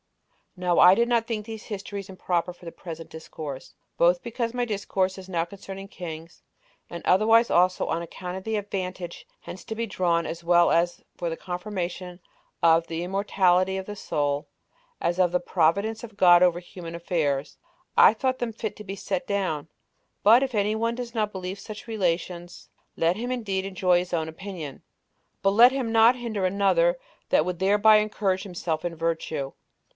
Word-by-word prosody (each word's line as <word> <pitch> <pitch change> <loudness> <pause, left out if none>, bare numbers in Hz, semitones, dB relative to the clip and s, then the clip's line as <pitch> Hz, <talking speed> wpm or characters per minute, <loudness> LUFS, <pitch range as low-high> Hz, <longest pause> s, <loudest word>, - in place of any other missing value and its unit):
5. - - -40
Now 180 -1 +1
I 180 +1 +8
did 235 +2 +2
not 235 -1 +1
think 215 -3 -3
these 220 -1 -8
histories 200 -1 -6
improper 180 -2 -1
for 175 - -17
the 165 - -6
present 165 -2 -9
discourse, 155 -3 -8 0.2
both 175 +1 +4
because 235 0 -3
my 245 0 0
discourse 195 -3 -1
now 170 -3 0
is - - -9
concerning 195 0 -9
kings, 165 -3 -8 0.5
and 170 - -8
otherwise 225 +5 +5
also 180 +1 +3
on 165 - -1
account 180 +1 -7
of 190 - -6
the 220 +1 -1
advantage 185 -3 -5 0.2
hence 185 - -9
to 220 - -5
be 230 +1 -2
drawn, 175 -5 0
as 170 +1 -6
well 175 0 +4 0.4
for 175 - -3
the 165 - -4
confirmation 180 -1 -5 0.4
of 165 0 +5
the 165 +1 -3
immortality 190 -1 +2
of 190 - -5
the 210 - -7
soul, 145 -6 -2 0.5
as 175 +2 -1
of 180 -2 +4
the 180 - +2
providence 200 +6 +1
of 220 -3 -10
God 175 -2 +7
over 175 -1 +3
human 170 -1 -9
affairs, 155 -5 -1 0.4
I - - +8
thought 260 +2 -1
them 240 -2 -2
fit 220 -1 -4
to 210 - -9
be 195 -1 -6
set 190 -2 -3
down; 180 -7 -2 0.5
but 230 +6 +7
if 260 -3 -3
any 210 +1 +1
one 230 +1 -1
does 240 -1 -6
not 215 -3 0
believe 190 0 -5
such 215 +3 -9
relations, 175 -4 -3 0.3
let 165 +2 +2
him 245 +3 -3
indeed 200 -6 -2
enjoy 185 -2 +2
his 180 0 -6
own 160 -2 0
opinion, 160 -4 -7 0.6
but 195 - +4
let 235 +5 +7
him 260 -4 -2
not 225 +2 +6
hinder 230 -5 -4
another 200 - +2 0.3
that - - +3
would 180 -1 -3
thereby 205 +3 +5
encourage 205 -3 0
himself 170 -5 -3
in 175 -1 -3
virtue. 160 -4 -2
185 Hz, 180 wpm, -26 LUFS, 175-215 Hz, 0.6 s, I